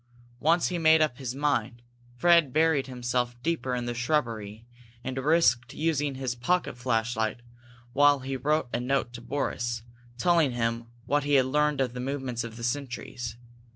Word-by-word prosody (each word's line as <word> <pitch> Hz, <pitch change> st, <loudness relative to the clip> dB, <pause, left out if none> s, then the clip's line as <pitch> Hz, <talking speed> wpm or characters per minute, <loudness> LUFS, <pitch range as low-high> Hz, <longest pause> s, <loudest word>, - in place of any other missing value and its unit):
Once 165 Hz, +3 st, +3 dB
he 180 Hz, -, -3 dB
had -, -, -4 dB
made 160 Hz, 0 st, +6 dB
up 150 Hz, -5 st, +1 dB
his 130 Hz, -2 st, -4 dB
mind, 130 Hz, -4 st, -1 dB, 0.3 s
Fred 170 Hz, -1 st, +5 dB
buried 155 Hz, -2 st, +2 dB
himself 125 Hz, -1 st, -2 dB
deeper 155 Hz, -6 st, -1 dB
in 120 Hz, -1 st, -3 dB
the 120 Hz, -, -2 dB
shrubbery 115 Hz, -5 st, -2 dB, 0.4 s
and 130 Hz, +1 st, -4 dB
risked 130 Hz, -5 st, +2 dB
using 150 Hz, -3 st, 0 dB
his 130 Hz, -2 st, -2 dB
pocket 155 Hz, +9 st, 0 dB
flashlight 115 Hz, -2 st, -1 dB, 0.5 s
while 145 Hz, 0 st, +5 dB
he 135 Hz, +1 st, -4 dB
wrote 150 Hz, +2 st, 0 dB
a -, -, 0 dB
note 125 Hz, -1 st, -1 dB
to 120 Hz, -, -8 dB
Boris, 120 Hz, -3 st, -2 dB, 0.3 s
telling 165 Hz, -4 st, +3 dB
him 115 Hz, -1 st, -1 dB, 0.2 s
what 145 Hz, +2 st, +1 dB
he 145 Hz, 0 st, +2 dB
had 130 Hz, -2 st, +5 dB
learned 150 Hz, +1 st, +1 dB
of 125 Hz, -2 st, -1 dB
the 125 Hz, -, -6 dB
movements 130 Hz, -2 st, -3 dB
of 115 Hz, -1 st, -8 dB
the 115 Hz, -, -8 dB
sentries. 120 Hz, -2 st, -4 dB
130 Hz, 170 wpm, -27 LUFS, 120-150 Hz, 0.5 s, made